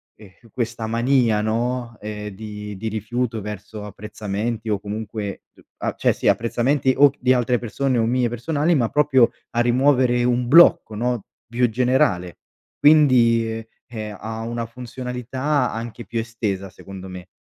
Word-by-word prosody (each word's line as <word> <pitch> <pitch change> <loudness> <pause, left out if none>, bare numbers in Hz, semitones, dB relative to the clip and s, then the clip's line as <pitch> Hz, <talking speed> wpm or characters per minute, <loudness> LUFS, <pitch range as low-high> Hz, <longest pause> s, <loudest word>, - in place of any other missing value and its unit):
ehm, 105 +2 -18
questa 115 -1 -3
mania, 115 -1 +2
no, 115 +2 -2
ehm, 105 0 -5
di 105 0 -8
di 110 +4 -4
rifiuto 110 +2 -2
verso 105 +1 -7
apprezzamenti 105 +2 -4
o 105 -2 0
comunque 105 0 -5
c - - -21 0.2
a - - -2
cioè, - - +2
sì, - - -3
apprezzamenti 130 +4 +2
o 140 0 +7
di 125 +1 +2
altre 125 -1 +2
persone 125 +2 -1
o 115 - +2
mie 125 +1 +1
personali, 145 +7 0
ma 120 -6 +1
proprio 135 -5 +4 0.2
a 120 - -1
rimuovere 125 0 +3
un 125 0 +1
blocco, 140 -6 +6
no, 120 -1 -1 0.2
più 120 +1 +1
generale. 120 - +1 0.4
Quindi, 125 -7 +5 0.4
ehm, 110 -3 -6
ha 110 +1 -5
una 115 +1 -3
funzionalità 125 +3 -3
anche 115 +1 -6
più 115 - -3
estesa, 105 -4 -3
secondo 95 +1 -10
me. 90 -1 -9
115 Hz, 150 wpm, -22 LUFS, 105-125 Hz, 0.4 s, o